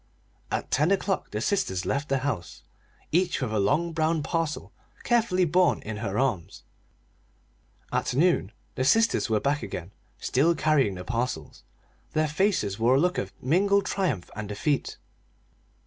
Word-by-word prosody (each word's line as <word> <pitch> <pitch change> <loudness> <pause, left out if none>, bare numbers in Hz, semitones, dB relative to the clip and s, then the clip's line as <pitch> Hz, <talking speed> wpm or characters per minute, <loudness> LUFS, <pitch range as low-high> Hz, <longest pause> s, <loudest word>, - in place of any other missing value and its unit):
At - - -3
ten 150 +5 +3
o'clock 195 0 0
the 105 - -3
sisters 95 - 0
left 140 +2 -1
the 135 - +2
house, 105 - -4 0.5
each 175 +2 +2
with 125 -6 -2
a 110 - +1
long 155 +11 +1
brown 160 -1 +1
parcel 165 -1 -2 0.3
carefully 225 -7 +2
borne 180 +3 +3
in 105 0 -5
her 105 -2 -3
arms. 120 -11 -1 1.3
At - - 0
noon 160 +7 +5
at 175 - +4
noon 95 - -11 0.2
the 130 - -1
sisters 225 - +3
were 110 -1 +2
back 145 +6 0
again, 90 +2 -6 0.3
still 160 +7 +2
carrying 145 -12 +2
the 90 - -7
parcels. 120 - -3 0.5
Their 155 0 +2
faces 150 - 0
wore 120 +3 +4
a - - +4
look 180 +3 +1
of 95 - -4
mingled 200 +8 +3
triumph 180 - -1
and 105 -1 -5
defeat. 135 +7 -1
145 Hz, 160 wpm, -26 LUFS, 110-175 Hz, 1.3 s, noon